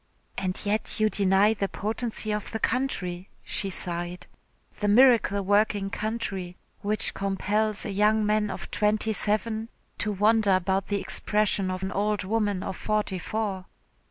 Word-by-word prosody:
"And 185 -1 -2
yet 215 +2 -1
you 215 0 +3
deny 200 +2 +4
the 200 -2 -1
potency 220 +1 -3
of 210 -1 -3
the 220 - -3
country," 190 -9 -2
she 195 - +1
sighed, 175 -1 -2 0.5
"the 210 - 0
miracle 230 -2 +5
working 205 0 +2
country, 200 -5 -3 0.2
which 210 +1 0
compels 205 +2 0
a 205 - -3
young 210 +2 +3
man 210 0 +1
of - - -7
twenty 210 +2 +1
seven 220 +2 -1 0.3
to 210 - 0
wonder 210 0 +3
about 190 +1 0
the 205 -1 0
expression 210 -2 0
of 185 0 -3
an 190 - -2
old 205 +1 0
woman 205 -1 0
of 190 - -4
forty 210 -3 -1
four." 200 -3 -3
205 Hz, 150 wpm, -26 LUFS, 190-215 Hz, 0.5 s, miracle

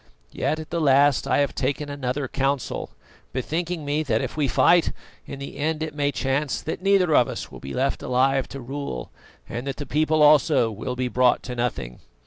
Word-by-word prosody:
Yet, 155 - -1
at 155 - -9
the 170 0 -1
last, 140 -1 +4
I - - +2
have 140 - 0
taken 140 +2 -2
another 140 -1 -3
council, 135 -1 -2 0.4
bethinking 160 +5 -3
me 145 +2 0
that, 115 -8 0
if - - -4
we 150 -2 +1
fight, 170 +6 +4 0.3
in 140 - -6
the 140 0 -8
end 155 +1 -1
it 155 -2 -4
may 145 -1 0
chance 135 +1 -1
that 160 - -5
neither 190 -4 +3
of 120 - +5
us - - -6
will - - -10
be 70 - -7
left 135 +2 0
alive 135 +1 +1
to 135 - -8
rule, 130 - -5 0.4
and 120 +4 -5
that 135 - -3
the 145 - -5
people 155 +1 +2
also 150 -5 +5
will 125 +4 -4
be 125 0 -1
brought 125 0 +2
to 125 - -5
nothing. 120 - -3
140 Hz, 200 wpm, -24 LUFS, 125-150 Hz, 0.4 s, of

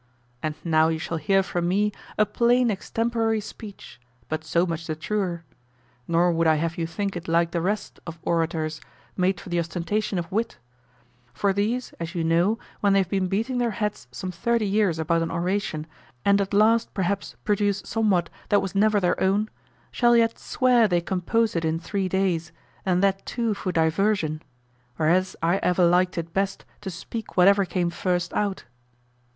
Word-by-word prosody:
And 155 -1 -2
now 160 -1 +3
you 160 0 0
shall 165 +1 -3
hear 195 +5 +2
from 175 -2 -2
me 205 +3 +2 0.3
a 215 - +4
plain 240 +2 +3
extemporary 225 +2 0
speech, 210 - -10 0.3
but 155 0 -2
so 170 +3 +1
much 165 -2 -4
the 155 - -2
truer. 175 0 -2 0.6
Nor 170 +1 +3
would 165 0 +2
I 160 - +5
have 165 +2 -1
you 165 -1 -2
think 195 +4 -3
it 175 - -6
like 170 +1 +2
the 170 - -1
rest 205 +4 -2
of 170 0 -6
orators, 160 -2 -1 0.3
made 185 0 +1
for - - -10
the 175 0 0
ostentation 180 +5 -2
of 170 -2 -4
wit; 225 +4 -1 0.8
for 200 -1 +1
these, 220 +6 -1
as 165 +2 -5
you 170 - 0
know, 170 +7 +2 0.2
when 200 -1 +3
they 195 - +5
have 185 - -4
been 190 -2 0
beating 225 +7 -1
their 240 -1 +1
heads 210 - -3
some 185 +9 -5
thirty 235 +4 0
years 200 -4 +2
about 165 +1 +1
an 165 - -1
oration 175 -2 -2 0.4
and 200 0 +4
at 195 - -3
last 220 +3 +3
perhaps 195 +1 -2
produce 205 -1 +1
somewhat 205 -6 +1 0.2
that 205 - +5
was 195 -2 -4
never 210 +1 +3
their 180 -2 0
own, 200 +3 +1 0.4
shall 240 -1 +4
yet 230 -1 +2
swear 245 -3 +3
they 175 -3 +2
composed 195 +5 0
it 165 - 0
in 160 0 0
three 195 +1 -2
days, 175 -3 0 0.4
and 180 0 +2
that 195 0 +2
too 230 -3 -1
for 195 -2 -3
diversion: 160 -1 +1 0.5
whereas 175 +5 +2
I 170 +3 +3
ever 180 -1 +2
liked 180 +1 +3
it 165 0 -4
best 195 0 -1 0.2
to 200 - -5
speak 200 +6 -7
whatever 200 +2 +6
came 175 -1 -1
first 175 -1 -1
out. 200 -2 -1
190 Hz, 180 wpm, -25 LUFS, 170-210 Hz, 0.8 s, whatever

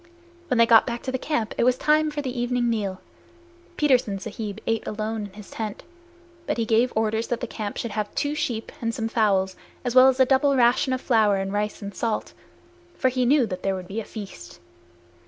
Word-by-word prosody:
When 250 - +1
they 230 - +6
got 230 +1 +6
back 235 -1 -4
to 260 -1 -3
camp 255 -5 -2
it - - +4
was 250 +1 +3
time 305 +2 +3
for 295 -1 -4
the 255 -2 -4
evening 245 0 0
meal. 200 -5 -2 0.8
Petersen 255 -9 +2
Sahib 205 +1 -6
ate 225 -1 -1
alone 215 0 -3
in 195 - -19
his 210 -1 -12
tent, 215 -2 -5 0.6
but - - -1
he 230 - 0
gave 230 +3 +3
orders 220 +1 0
that 240 - -2
the - - -3
camp 210 -2 -5
should 235 - -3
have 210 -1 -3
two 290 0 0
sheep 245 -7 -3
and 230 -1 -1
some 225 - -2
fowls, 195 -5 +1 0.3
as 245 - -1
well 255 +1 +8
as 265 0 +2
a 260 - +7
double 275 +2 +3
ration 250 +1 +3
of 255 0 -1
flour 220 -5 +3
and 195 0 -2
rice 210 +1 -2
and 200 0 -6
salt, 225 0 -2 0.6
for 260 - +2
he 255 -1 0
knew 275 -1 +4
that 185 -4 -5
there 195 -1 0
would 185 -1 -7
be 205 +4 -4
a - - -4
feast. 195 - -10
230 Hz, 215 wpm, -24 LUFS, 210-255 Hz, 0.8 s, well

